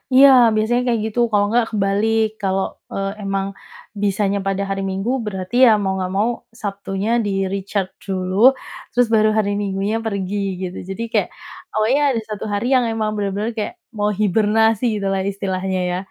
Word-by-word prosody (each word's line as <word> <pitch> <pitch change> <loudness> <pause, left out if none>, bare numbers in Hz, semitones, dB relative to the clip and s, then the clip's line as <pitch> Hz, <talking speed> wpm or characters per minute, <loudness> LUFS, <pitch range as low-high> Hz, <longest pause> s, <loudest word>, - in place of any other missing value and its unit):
Iya, 275 +1 +9 0.3
biasanya 225 +3 +1
kayak 230 -2 +1
gitu, 220 +2 -3
kalau 205 -1 +3
nggak 240 0 +3
kebalik 215 +2 +1 0.2
kalau, 190 0 +1 0.3
eee, 195 0 -2
emang 195 0 -1 0.6
bisanya 200 0 +1
pada 195 0 0
hari 195 0 -2
Minggu 195 +4 -2 0.2
berarti 190 +2 -5
ya - - +7
mau 190 - 0
nggak 185 -1 -2
mau 215 +4 +2 0.3
Sabtunya 195 0 -3 0.2
di-recharge 195 0 -2
dulu, 185 -1 -2 0.6
terus 245 0 +3
baru 215 0 +4
hari 210 -2 +2
Minggunya 195 +2 -1
pergi 200 -2 -2 0.3
gitu. 180 -1 -5
Jadi 195 +4 -5
kayak, - - +1 0.4
awalnya 225 +7 +2
ada 230 - -1
1 210 0 -5
hari 205 +3 -1
yang 250 -2 +3
emang 220 -1 -1
bener-bener 205 +2 -2
kayak 210 - -3 0.3
mau 205 0 +2
hibernasi 220 +2 +2
gitulah 195 -2 -1
istilahnya 190 -1 -2
ya. 180 - -1
200 Hz, 160 wpm, -20 LUFS, 195-220 Hz, 0.6 s, Iya